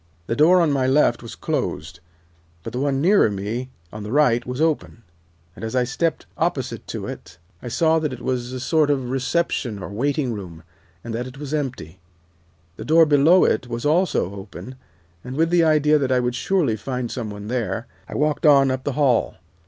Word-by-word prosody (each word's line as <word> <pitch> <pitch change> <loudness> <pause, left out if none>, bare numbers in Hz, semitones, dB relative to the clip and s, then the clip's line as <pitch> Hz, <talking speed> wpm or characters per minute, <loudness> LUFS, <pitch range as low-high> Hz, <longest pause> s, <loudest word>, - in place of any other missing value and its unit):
The 115 - -2
door 170 +6 +5
on 165 -3 +2
my 135 -2 +1
left 130 -3 +3
was 115 - -9
closed, 85 +4 -3 0.6
but 115 - -7
the 125 - -2
one 140 -1 0
nearer 190 - +4
me 105 +6 -4 0.2
on 105 - -7
the 105 +1 -6
right 125 -4 +3
was 125 +1 -4
open, 155 -7 -1 0.5
and 100 - -11
as 110 +2 -4
I 125 - +3
stepped 160 +7 -2
opposite - - -2
to - - -5
it 85 -2 -9 0.2
I - - -8
saw 160 +6 +2
that 150 -3 -2
it 130 - -7
was 125 -1 -2
a 130 - -5
sort 155 +3 +2
of 130 -4 -1
reception 130 -4 -1
or 95 - -7
waiting 130 +4 -1
room, 90 -6 -8 0.4
and 115 - -6
that 120 +3 -3
it 130 +1 -11
was 145 0 -6
empty. 125 - -4 0.8
The - - -7
door 165 +1 +6
below 155 +5 +5
it 125 - 0
was 120 +1 -5
also 155 - +1
open, 100 +6 -9 0.5
and 125 +1 -7
with 165 +3 +1
the 175 -1 +4
idea 150 -1 +4
that 135 -2 -1
I 130 - +3
would 125 0 -1
surely 140 - 0
find 125 +2 -4
some 115 -4 -4
one 105 0 -8
there, 115 -2 -2 0.2
I - - -7
walked 150 +1 +1
on 135 -2 +6
up 130 0 -3
the 145 - -1
hall. 130 -4 +2
130 Hz, 200 wpm, -22 LUFS, 115-150 Hz, 0.8 s, door